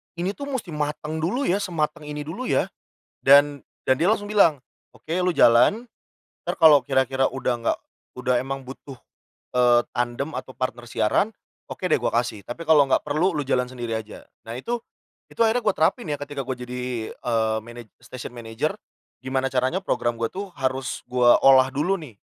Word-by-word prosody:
ini 180 +3 -1
tuh 280 +6 -7
musti 260 -11 -4
mateng 150 +1 -3
dulu 205 - -1
ya 195 -4 +1
sematang 155 -4 -2
ini 150 0 -5
dulu 190 +12 -5
ya." - - +1 0.5
Dan 145 +1 +5 0.2
dan 130 +2 +2
dia 170 - +2
langsung 205 -1 0
bilang, 160 -10 +4 0.3
"Oke 165 +4 -3
lu 180 -1 +1
jalan 125 - +5 0.6
ntar - - -3
kalau 150 -4 +8
kira-kira 130 0 +1
udah 130 -1 -1
nggak, - - 0 0.4
udah 125 0 +1
emang 135 -1 -5
butuh, 135 -1 -10 0.6
eee, 120 -1 +5 0.2
tandem 120 +4 -1
atau - - -6
partner 120 -2 -3
siaran, 195 - +1 0.4
oke 185 - -4
deh - - +4
gua - - +1
kasih. 110 -4 -6
Tapi 160 +9 -7
kalau 150 -2 +7
nggak - - +4
perlu 160 +6 +2
lu 150 -5 -3
jalan 125 -2 0
sendiri 120 -3 -4
aja." 110 -1 -7 0.2
Nah, 115 +2 -7
itu 235 - -3 0.5
itu - - -18
akhirnya 235 +2 +1
gua 215 - +2
terapin 160 +3 +1
ya 145 - -2
ketika 145 -1 -5
gua 130 0 -3
jadi, 125 -2 -4
eee, 110 -2 0
manaj 120 0 -11 0.2
station 125 -1 -9
manager 120 - -3 0.5
gimana 130 0 0
caranya 130 +8 0
program 120 -10 -1
gua 115 - +1
tuh, 195 - -7
harus 130 -2 -2
gua 125 -1 +5
olah 130 -1 +6
dulu 155 +8 +1
nih, 135 - -12
135 Hz, 180 wpm, -24 LUFS, 125-165 Hz, 0.6 s, kalau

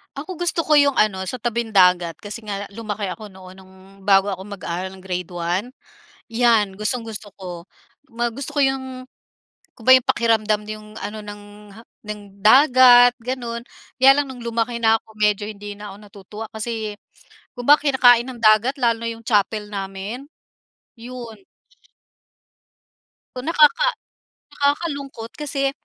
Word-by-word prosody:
Ako, 305 +7 -6
gusto 345 0 -2
ko 305 - +5
'yong 285 -2 +4
ano 195 -3 +2
sa 250 +7 -5
tabing-dagat 190 -8 +2
kasi 210 +2 -8
nga 200 -1 -5
lumaki 215 -2 -4
ako 200 +3 -8
noon 185 -1 -13
no'ng 190 0 -17 0.3
bago 195 0 +4
ako 190 -2 -4
mag-aaral 190 -2 -5
ng 190 - -13
grade 180 -2 -4
1, 175 +7 -2 0.6
'yan 230 -4 +2
gustong-gusto 215 0 -4
ko. 175 -2 -8 0.5
Ma 240 +1 -1
gusto 265 +5 -6
ko 290 - -2
'yong 260 -2 -1 0.7
kumba 245 +1 +2
'yong 255 - +3
pakiramdam 220 -2 +1
'yong 215 0 -9
ano 215 +1 -6
ng, 205 0 -9 0.3
ha 225 - -12 0.3
ng 210 0 -6 0.2
dagat 245 -1 +7
gano'n. 240 -2 -4 0.4
Kaya 265 +1 +8
lang 290 - -1
no'ng 250 -2 -10
lumaki 235 0 -2
na 225 0 +5
ako 220 - -22
medyo 210 -1 +2
hindi 205 -1 -8
na 210 -1 -8
ako - - -13
natutuwa, 205 +2 -10
kasi 220 -1 -4 0.6
kumba 280 +5 +5
kinakain 250 -4 +4
ng 255 - -7
dagat 215 +4 +4
lalo 230 -2 +1
na - - -1
'yong 230 0 -13
chapel 210 -1 +1
namin, 195 +7 -6 0.7
'yon. 235 -1 -9 2.0
Nakaka 310 - +3 0.6
nakakalungkot 280 -5 -2
kasi 275 -2 -1
225 Hz, 140 wpm, -21 LUFS, 205-255 Hz, 2.0 s, Kaya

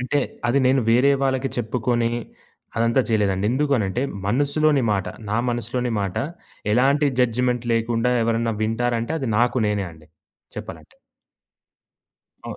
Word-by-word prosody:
అంటే 130 +4 0 0.3
అది 135 +3 +3
నేను 130 +1 +4
వేరే 125 +5 +5
వాళ్ళకి 135 0 0
చెప్పుకొని, 120 0 0 0.7
అదంతా 115 +3 +3
చేయలేదండి. 100 -3 +1
ఎందుకనంటే 125 -6 0 0.2
మనసులోని 145 +5 +2
మాట, 95 -2 -1 0.2
నా 110 - +1
మనసులోని 120 +1 -2
మాట 100 -2 -3 0.6
ఎలాంటి 140 +4 +3
జడ్జ్‌మెంట్ 125 0 +1
లేకుండా 115 +2 +1
ఎవరైనా 115 0 0
వింటారంటే 115 +4 -1
అది 135 -5 -3
నాకు 120 +1 +2
నేనే 100 -2 -1
అండి 80 -1 -17 0.5
చెప్పాలంటే. - - -9 1.5
అవు - - -6
120 Hz, 120 wpm, -22 LUFS, 115-130 Hz, 1.5 s, వేరే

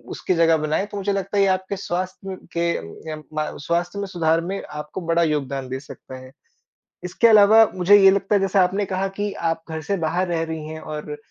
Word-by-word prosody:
उसकी 185 - -1
जगह 165 -1 +4
बनाएँ, 155 +5 -1
तो 205 -1 -8
मुझे 200 +1 -1
लगता 195 +1 -3
है - - +4
ये 195 - +3
आपके 190 +1 -1
स्वास्थ्य 185 +1 -4 0.2
के 170 0 +1 0.5
यम 155 0 -7 0.2
म 155 - -3
स्वास्थ्य 175 +4 -1
में 200 - -2
सुधार 165 -3 +1
में 190 +4 -4
आपको 150 +5 -7
बड़ा 170 0 +3
योगदान 140 -4 -2
दे 130 +1 -4
सकता 130 -2 -11
है। 130 0 -13 0.7
इसके 180 +6 +2
अलावा 215 0 +7
मुझे 185 +3 +6
ये 195 -1 +7
लगता 200 +1 +1
है 200 - +2
जैसे 195 0 +1
आपने 190 +3 +2
कहा 190 0 -2
कि 205 0 -1 0.2
आप 165 0 -5
घर 160 0 -4
से 195 +6 -2
बाहर 170 +3 -1
रह 170 -2 -1
रही 160 -1 -5
है 160 0 -7
और 150 -1 -6
175 Hz, 220 wpm, -22 LUFS, 160-195 Hz, 0.7 s, अलावा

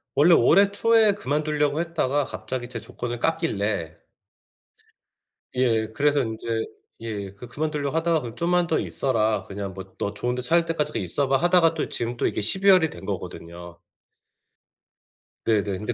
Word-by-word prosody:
원래 165 +5 +6
올해 200 +4 +5
초에 220 0 +4
그만두려고 150 -3 -1
했다가 150 -4 0
갑자기 130 -1 -5
제 120 -2 -5
조건을 120 +2 -6
깎길래 105 - -1 1.6
예, 115 -4 +2
그래서 145 0 +2
인제 110 0 -3 0.3
예 105 -4 -5
그 125 - -10
그만두려고 150 -1 -3
하다가 165 -1 +1
"그럼 120 -2 -7
좀만 175 +1 +1
더 160 - +1
있어라. 110 -6 0
그냥 100 0 -6
뭐 95 0 -10
너 100 - -3
좋은데 125 +3 -2
찾을 170 +5 +2
때까지 150 -3 -1
그 - - -3
있어 105 +10 -1
봐." 135 - +4
하다가 175 -1 +4
또 155 - -2
지금 120 +1 -2
또 - - -1
이게 - - -2
12 190 - +3
월이 180 -4 +6
된 - - -11
거거든요. 85 0 -7 1.7
네네. 110 -3 +2
근데, 105 +5 -4
135 Hz, 315 characters per minute, -24 LUFS, 110-165 Hz, 1.7 s, 원래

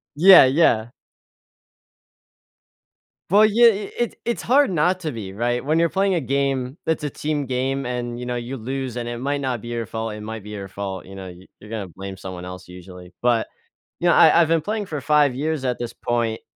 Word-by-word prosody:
Yeah, 180 +1 +9
yeah. 130 -5 +3 2.4
Well, 205 +4 +6
yeah, 230 +3 +5
it 205 -2 0
it 240 - -1
it's 235 -1 -1
hard 280 +4 +3
not 180 +3 +1
to 160 -3 -3
be 110 -6 -7
right? 120 +3 -1
When 155 +4 +1
you're 170 -1 +3
playing 195 -1 +1
a 170 - 0
game, 135 0 -1
that's 160 -2 -1
a - - -1
team 150 +1 -3
game 130 +1 -2
and, 120 -1 -4
you 125 - -6
know, 125 0 -3
you 120 +3 -5
lose 130 +1 -4
and 120 -1 -4
it 120 0 -5
might 140 +3 -1
not 130 -4 -2
be 120 - -8
your 115 -1 -3
fault, 110 +1 -4
it 105 - -8
might 110 0 -7
be 105 - -10
your 100 -2 -6
fault. 95 -1 -6
You 95 - -11
know, 95 -1 -8
you 90 +1 -13
you're 105 - -14
gonna 110 -4 -4
blame 95 +2 -9
someone 95 -2 -8
else 90 0 -9
usually. 90 0 -12
But, 120 -2 +2 0.5
you 175 - +1
know, - - +5
I 165 +1 +6
I've 165 - +3
been 165 -1 +2
playing 210 +4 -3
for 150 -4 -4
5 145 -1 +3
years 150 0 -2
at 125 -2 -1
this 120 -1 -5
point, 115 -2 -2
125 Hz, 215 wpm, -22 LUFS, 110-155 Hz, 2.4 s, Yeah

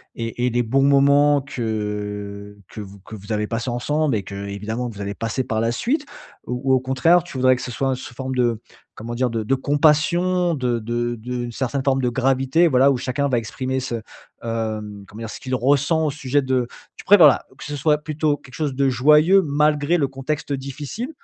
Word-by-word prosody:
et 115 +1 -3
et - - +2
les 120 0 0
bons 135 +4 +1
moments 140 +1 +4
que 105 -4 -5
que - - -10
vous 100 -1 -9
que 105 +3 -11
vous 105 +2 -6
avez 105 0 -1
passés 115 +2 -3
ensemble 145 +3 0
et 100 - -2
qu'évidemment 100 +5 -5
vous 105 -4 -8
allez 100 0 -4
passer 115 +3 -2
par 110 -3 -2
la 115 +1 +1
suite? 285 - -1 0.4
Ou 125 +2 -2
ou, - - +6
au 130 - +4
contraire, 135 +7 +3
tu 175 - -12
voudrais 130 0 +4
que - - -7
ce 125 - -5
soit 135 +3 -1
sous 130 0 -9
forme 130 +1 -4
de, 120 -3 +1 0.3
comment 120 +2 -7
dire? 125 0 0
De 115 -1 -2
de 110 +5 +1
compassion, 170 +6 +2
de 125 -5 -1
de 120 +1 -2
d'une 120 +1 -5
certaine 130 +3 -2
forme 135 -1 +1
de 125 - +2
gravité, 135 +6 +2
voilà, 135 -1 +4
où 135 - 0
chacun 130 +3 -1
va 125 -3 +2
exprimer 130 +4 -3
ce, 130 -2 -4 0.5
hem, 110 -3 -4
comment 105 - -12
dire? 115 - -5
Ce - - -8
qu'il 130 0 -3
ressent 140 +5 +2
au 150 - 0
sujet 140 0 0
de 130 -2 0 0.3
tu - - -10
préfères, 195 -4 +8
voilà, 145 - +4
que - - -10
ce 145 - -5
soit 150 +2 +2
plutôt 150 0 -1
quelque 130 - -17
chose 150 -4 -2
de 135 0 +2
joyeux 150 +9 +5
malgré 150 +2 +2
le 145 -4 +1
contexte 140 +2 -4
difficile? 140 - -5
130 Hz, 210 wpm, -21 LUFS, 115-145 Hz, 0.5 s, préfères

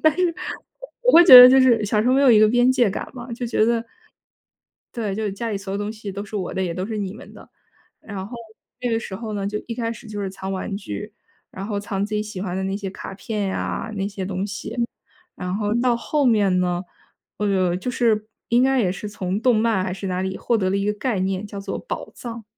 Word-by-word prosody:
但 315 0 +4
是 355 -2 +1 0.7
我 - - +4
会 340 - +9
觉 295 - +10
得 250 0 +13
就 265 0 +6
是 235 -5 +4
小 210 +1 +1
时 235 - +1
候 255 - +4
没 275 - +4
有 265 - +6
一 220 - +7
个 215 0 +6
边 245 +2 +4
界 245 -4 +3
感 195 - -4
嘛。 245 -1 -9
就 245 +1 -4
觉 230 -2 +1
得 235 0 +1 1.1
对， 210 -5 -3
就 220 - -3
是 205 - -1
家 230 +3 -4
里 205 - -2
所 195 0 -7
有 200 - -2
东 205 +1 -3
西 215 -3 -7
都 200 +2 -5
是 210 +1 -8
我 185 -3 -3
的， 190 - -2
也 175 -2 -2
都 185 +1 -3
是 220 - -4
你 195 -2 -3
们 220 - -12
的。 - - -14 0.5
然 195 -3 -6
后， 240 - -8 0.4
这 245 - -2
个 225 - +1
时 190 -4 -7
候 220 +1 -6
呢， 200 -1 -2
就 210 - -2
一 230 - -3
开 230 -1 -2
始 225 - -13
就 210 -1 -5
是 195 - -2
藏 190 0 -6
玩 195 +1 -3
具， 210 +1 -7 0.4
然 190 +1 -6
后 205 -2 -2
藏 200 -1 -2
自 215 - -7
己 210 - 0
喜 210 -3 -7
欢 185 -2 -3
的 190 - -2
那 195 +1 -2
些 195 -2 -5
卡 190 - -8
片 205 0 -3
呀、 205 +3 -3
那 195 -1 -2
些 200 -2 -5
东 190 0 -3
西， 210 +3 -6 0.6
然 180 0 -4
后 210 0 -1
到 240 0 +2
后 285 +4 0
面 205 -6 +3
呢 180 0 0 0.5
呃， 190 -4 +1
就 250 - -4
是 225 -4 +1 0.2
应 240 +2 +4
该 265 0 +3
也 180 -3 +1
是 210 - -6
从 195 0 -3
动 250 -3 +4
漫 215 -4 +2
还 185 - -3
是 195 0 -5
哪 185 0 -1
里 190 0 -3
获 235 - 0
得 190 -3 0
了 190 - 0
一 200 - -1
个 210 - +1
概 215 -1 -2
念， 190 +1 -1
叫 200 -1 -7
做 195 - -4
“宝 - - -5
藏”。 230 -2 -8
210 Hz, 280 characters per minute, -22 LUFS, 195-235 Hz, 1.1 s, 得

